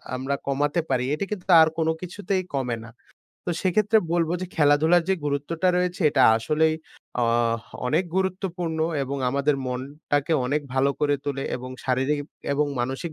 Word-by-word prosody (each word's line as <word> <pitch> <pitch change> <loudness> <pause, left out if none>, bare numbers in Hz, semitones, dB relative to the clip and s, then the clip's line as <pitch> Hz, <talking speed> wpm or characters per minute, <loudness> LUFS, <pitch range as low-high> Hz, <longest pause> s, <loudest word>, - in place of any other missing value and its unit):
আমরা 135 +2 -2
কমাতে 145 +4 +1
পারি 130 -2 +1
এটি 175 +6 -1
কিন্তু 190 -4 -5
আর 160 - +6
কোনো 160 0 +2
কিছুতেই 185 +1 -2
কমে 125 -4 -1
না। 115 - -12 0.6
তো - - 0
সেক্ষেত্রে 210 +4 +3
বলব 170 -2 +2
যে 185 - -3
খেলাধুলার 160 +3 +4
যে 190 - +4
গুরুত্বটা 145 +5 0
রয়েছে 180 0 -1
এটা - - +3
আসলেই 155 +7 +1 0.5
আ - - +2 0.6
অনেক 155 +8 +2
গুরুত্বপূর্ণ 180 -3 -2 0.2
এবং 135 +1 -3
আমাদের 140 +2 +1
মনটাকে 140 +4 -2
অনেক 145 +4 +1
ভালো 135 +1 +3
করে 145 -1 +3
তোলে 140 -1 -2
এবং 130 +1 -8
শারীরিক 130 +3 +1 0.3
এবং 145 +1 +1
মানসিক 135 +7 -3
150 Hz, 155 wpm, -25 LUFS, 135-175 Hz, 0.6 s, আর